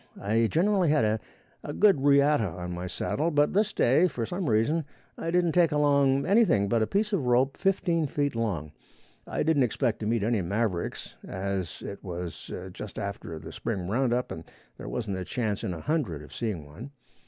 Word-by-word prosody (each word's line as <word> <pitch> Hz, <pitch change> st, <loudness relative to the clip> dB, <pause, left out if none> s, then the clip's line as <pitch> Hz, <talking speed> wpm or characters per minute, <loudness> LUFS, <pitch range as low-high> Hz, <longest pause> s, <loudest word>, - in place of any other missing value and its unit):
I 115 Hz, +3 st, +2 dB
generally 185 Hz, -, +2 dB
had 150 Hz, -6 st, +3 dB, 0.6 s
a 145 Hz, -, -5 dB
good 195 Hz, -7 st, +4 dB
riata 140 Hz, -4 st, +4 dB
on 90 Hz, 0 st, -6 dB
my 90 Hz, +1 st, -4 dB
saddle, 155 Hz, -, -1 dB
but 145 Hz, -2 st, +2 dB
this 210 Hz, +2 st, +2 dB
day, 140 Hz, +9 st, +4 dB
for 120 Hz, -9 st, -3 dB
some 175 Hz, -, -3 dB
reason, 115 Hz, +10 st, +2 dB, 0.3 s
I 165 Hz, -, -4 dB
didn't 175 Hz, -1 st, +2 dB
take 170 Hz, -1 st, +4 dB
anything 140 Hz, -, +3 dB
but 115 Hz, +2 st, +1 dB
a 110 Hz, -, +2 dB
piece 210 Hz, +2 st, 0 dB
of 150 Hz, -10 st, 0 dB
rope 130 Hz, +3 st, +3 dB
fifteen 175 Hz, -5 st, +1 dB
feet 145 Hz, -1 st, -1 dB
long. 95 Hz, -10 st, -2 dB, 0.6 s
I -, -, -1 dB
didn't 155 Hz, -2 st, +3 dB
expect 120 Hz, -1 st, 0 dB
to 105 Hz, -, -3 dB
meet 115 Hz, -2 st, +1 dB
any 110 Hz, -1 st, +1 dB
mavericks, 100 Hz, 0 st, -2 dB
as 95 Hz, -2 st, -4 dB
it 100 Hz, -, -7 dB
was 90 Hz, -2 st, -6 dB, 0.2 s
just 105 Hz, +1 st, -8 dB
after 100 Hz, -5 st, -5 dB
the 80 Hz, +1 st, -9 dB
spring 95 Hz, -1 st, -3 dB
roundup 125 Hz, +3 st, 0 dB
and 80 Hz, -, -6 dB, 0.4 s
there -, -, -6 dB
wasn't 105 Hz, -5 st, -3 dB
a -, -, -3 dB
chance 105 Hz, 0 st, -2 dB
in -, -, -2 dB
a 85 Hz, -3 st, -6 dB
hundred 115 Hz, -, -1 dB
of 75 Hz, -, -13 dB
seeing 105 Hz, -10 st, -3 dB
one. 80 Hz, -, -10 dB
120 Hz, 185 wpm, -28 LUFS, 100-150 Hz, 0.6 s, good